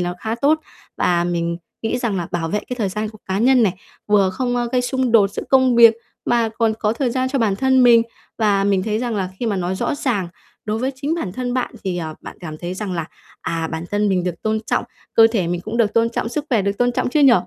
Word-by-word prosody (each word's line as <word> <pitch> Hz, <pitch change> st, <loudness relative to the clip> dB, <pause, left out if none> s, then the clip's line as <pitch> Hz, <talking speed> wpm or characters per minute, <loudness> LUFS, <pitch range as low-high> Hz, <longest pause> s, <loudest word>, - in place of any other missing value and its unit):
nó 175 Hz, 0 st, -2 dB
khá 220 Hz, 0 st, -2 dB
tốt. 295 Hz, +6 st, +2 dB, 0.4 s
Và 175 Hz, -1 st, +2 dB
mình 170 Hz, -1 st, -1 dB, 0.3 s
nghĩ 225 Hz, +3 st, -1 dB
rằng 230 Hz, -5 st, -1 dB
là 175 Hz, -2 st, -3 dB
bảo 165 Hz, -2 st, -2 dB
vệ 210 Hz, -, 0 dB
cái 250 Hz, -, -4 dB
thời 205 Hz, -, 0 dB
gian 210 Hz, +3 st, -3 dB
của 215 Hz, 0 st, -12 dB
cá 190 Hz, 0 st, -1 dB
nhân 250 Hz, +2 st, +4 dB
này, 195 Hz, -, +3 dB, 0.3 s
vừa 200 Hz, -2 st, +3 dB
không, 245 Hz, +5 st, -1 dB
a, 240 Hz, -, 0 dB
gây 250 Hz, -, +3 dB
xung 255 Hz, -1 st, 0 dB
đột 205 Hz, -4 st, +5 dB
giữa -, -, -5 dB
công 260 Hz, -2 st, +4 dB
việc, 230 Hz, -1 st, +8 dB, 0.3 s
mà 235 Hz, -2 st, +2 dB
còn 225 Hz, -1 st, +2 dB
có 210 Hz, 0 st, +1 dB
thời 250 Hz, +1 st, -1 dB
gian 260 Hz, +1 st, 0 dB
cho 275 Hz, -, -1 dB
bản 210 Hz, -5 st, +1 dB
thân 260 Hz, 0 st, +3 dB
mình. 235 Hz, -2 st, +7 dB, 0.4 s
Và 205 Hz, -3 st, +2 dB
mình 195 Hz, -2 st, +2 dB
thấy 215 Hz, +1 st, -1 dB
rằng 240 Hz, -2 st, -2 dB
là 190 Hz, -2 st, -1 dB
khi 240 Hz, -, -2 dB
mà 205 Hz, -3 st, 0 dB
nói 180 Hz, 0 st, -1 dB
rõ 190 Hz, -, -1 dB
ràng 230 Hz, -11 st, -1 dB, 0.4 s
đối 215 Hz, +1 st, -2 dB
với 260 Hz, +3 st, -1 dB
chính 285 Hz, +4 st, -2 dB
bản 200 Hz, -, -4 dB
thân 250 Hz, +2 st, -3 dB
bạn 255 Hz, -, -1 dB
thì, 180 Hz, -2 st, -2 dB
ờ, 160 Hz, -2 st, -5 dB
bạn -, -, -10 dB
cảm 155 Hz, -3 st, -7 dB
thấy 175 Hz, +2 st, -5 dB
rằng 195 Hz, -1 st, -4 dB
là, 165 Hz, -2 st, -3 dB, 0.3 s
à, 165 Hz, -1 st, -2 dB
bản 160 Hz, +1 st, -4 dB
thân 205 Hz, 0 st, +1 dB
mình 185 Hz, -2 st, +1 dB
được 175 Hz, -2 st, -4 dB
tôn 220 Hz, 0 st, 0 dB
trọng, -, -, 0 dB, 0.3 s
cơ 225 Hz, 0 st, +8 dB
thể 190 Hz, -7 st, +1 dB
mình 175 Hz, 0 st, -2 dB
cũng 215 Hz, +5 st, -5 dB
được 220 Hz, -3 st, +2 dB
tôn 230 Hz, 0 st, +3 dB
trọng, 230 Hz, -, -2 dB
sức 285 Hz, +5 st, -3 dB
khỏe 225 Hz, -7 st, +2 dB
được 200 Hz, +1 st, -2 dB
tôn 245 Hz, 0 st, +2 dB
trọng -, -, 0 dB
chứ 300 Hz, -, +2 dB
nhỉ? 270 Hz, -3 st, +7 dB
220 Hz, 270 wpm, -20 LUFS, 185-245 Hz, 0.4 s, việc